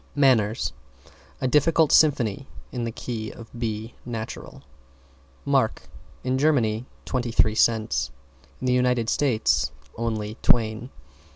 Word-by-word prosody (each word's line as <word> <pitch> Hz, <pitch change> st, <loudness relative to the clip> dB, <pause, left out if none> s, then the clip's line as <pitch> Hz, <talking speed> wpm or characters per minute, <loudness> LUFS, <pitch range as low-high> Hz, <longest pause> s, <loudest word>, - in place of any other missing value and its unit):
=MANNERS= 115 Hz, -, +3 dB, 0.7 s
A 130 Hz, -, +1 dB
difficult 155 Hz, +3 st, +3 dB
symphony 135 Hz, -5 st, +3 dB, 0.2 s
in 120 Hz, -2 st, -3 dB
the 115 Hz, -, -3 dB
key 110 Hz, -1 st, -5 dB
of 115 Hz, +1 st, -12 dB
B 115 Hz, -1 st, -4 dB
natural. 110 Hz, -, -7 dB, 0.8 s
=MARK= -, -, +1 dB, 0.4 s
In 130 Hz, +1 st, 0 dB
Germany, 125 Hz, -6 st, +2 dB, 0.2 s
twenty 125 Hz, -2 st, -2 dB
three 110 Hz, -1 st, +3 dB
cents. 110 Hz, -11 st, +2 dB, 0.5 s
In -, -, -5 dB
the 125 Hz, -, +3 dB
United 125 Hz, -2 st, +2 dB
States, 130 Hz, -7 st, +1 dB, 0.2 s
only 110 Hz, -1 st, -3 dB
Twain. 115 Hz, +1 st, +2 dB
115 Hz, 115 wpm, -25 LUFS, 110-130 Hz, 0.8 s, =MANNERS=